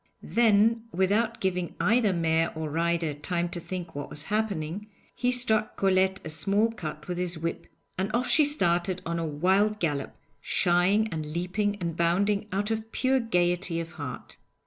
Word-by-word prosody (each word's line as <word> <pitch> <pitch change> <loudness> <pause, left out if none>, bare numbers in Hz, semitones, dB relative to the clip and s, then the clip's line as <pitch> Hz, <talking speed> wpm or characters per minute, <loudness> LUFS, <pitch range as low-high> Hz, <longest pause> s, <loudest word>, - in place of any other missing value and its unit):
Then, 225 0 +3
without 210 +6 +1
giving 180 -2 -2
either 225 -1 +3
mare 165 -1 +1
or 155 -1 -4
rider 165 -1 0
time 170 +4 -1
to 175 - -3
think 175 -1 -6
what 145 0 -6
was 145 - -3
happening, 200 -3 -2 0.3
he 250 0 0
struck 220 -4 +1
Colette 190 0 +2
a - - -4
smart 205 +8 +1
cut 155 -5 -6
with 180 -1 -3
his 180 -1 -2
whip, 165 +1 -4 0.3
and 190 +2 0
off 245 +2 0
she 310 - +5
started 185 - +1
on 170 0 -2
a 165 - -2
wild 190 +8 +2
gallop, 145 -5 -2 0.3
shying 180 +5 +2
and 155 -2 -4
leaping 195 +4 -1
and 170 -5 -4
bounding 200 +5 +1
out 205 +3 -1
of 220 0 -3
pure 265 0 +2
gaiety 175 -5 0
of 165 0 -5
heart. 145 -6 -8
180 Hz, 170 wpm, -27 LUFS, 170-210 Hz, 0.3 s, she